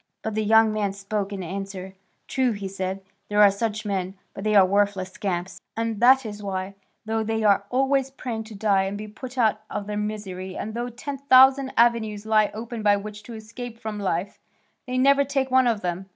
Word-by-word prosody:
But 220 - -3
the 215 +1 0
young 220 0 +5
man 205 -2 -1
spoke 200 0 -3
in 195 -2 -5
answer: 190 +1 -6 0.3
"True," 260 -3 +1
he 200 -1 -5
said, 190 0 -4 0.3
"there 205 0 +1
are 205 -1 +8
such 215 +1 -3
men, 190 -2 -2 0.2
but 195 - -7
they 215 0 +1
are 195 -2 +8
worthless 195 -1 +1
scamps, 185 -2 -4 0.2
and 225 -2 -2
that 260 +2 +6
is 210 -1 -6
why, 190 -1 -4 0.3
though 220 0 -1
they 220 0 -1
are 200 -1 +3
always 270 +1 +1
praying 240 -4 -5
to 220 -1 -10
die 200 -2 +2
and 195 +1 -3
be 215 +1 -7
put 250 +5 -9
out 215 -3 +2
of 205 - -4
their 210 0 -4
misery 195 -3 -5
and 220 - -5
though 240 +2 -3
ten 275 +3 -6
thousand 265 0 +6
avenues 220 -3 +2
lie 215 -1 +3
open 230 +1 -6
by 205 -1 +4
which 210 +1 -8
to 230 +2 -10
escape 230 +2 -8
from 215 -2 -5
life, 190 0 -2 0.5
they 255 0 -2
never 280 +2 +5
take 270 -1 -1
one 260 -1 +5
of 225 -3 +1
them. 180 +1 -3
215 Hz, 210 wpm, -24 LUFS, 200-235 Hz, 0.5 s, are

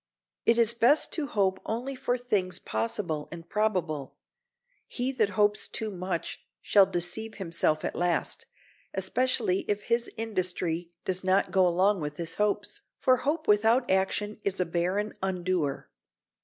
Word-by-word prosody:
It 230 - +5
is 235 -1 +4
best 240 +6 +3
to 310 -4 -1
hope 195 -5 +1
only 245 +5 -3
for 255 -1 -1
things 205 -7 0
possible 150 - -3
and 170 0 -9
probable; 180 -9 -1 0.7
he 255 +1 -2
that 225 -6 +1
hopes 210 0 +3
too 220 -2 -3
much 180 -2 -4 0.2
shall 200 -2 +5
deceive 195 +5 -2
himself 165 -4 +1
at - - -3
last, 175 -2 0 0.5
especially 195 -1 +1
if 205 0 -1
his 235 0 0
industry 185 -6 -2 0.2
does 185 0 0
not 190 +1 +2
go 190 -2 +4
along 185 +2 +2
with 150 0 -4
his 165 -1 -2
hopes, 210 -1 0 0.2
for 255 0 +4
hope 310 +5 -2
without 225 +4 +4
action 200 +2 0
is 195 -1 -1
a 180 - +2
barren 180 +5 -1
undoer. 180 -6 -1
195 Hz, 145 wpm, -28 LUFS, 175-225 Hz, 0.7 s, It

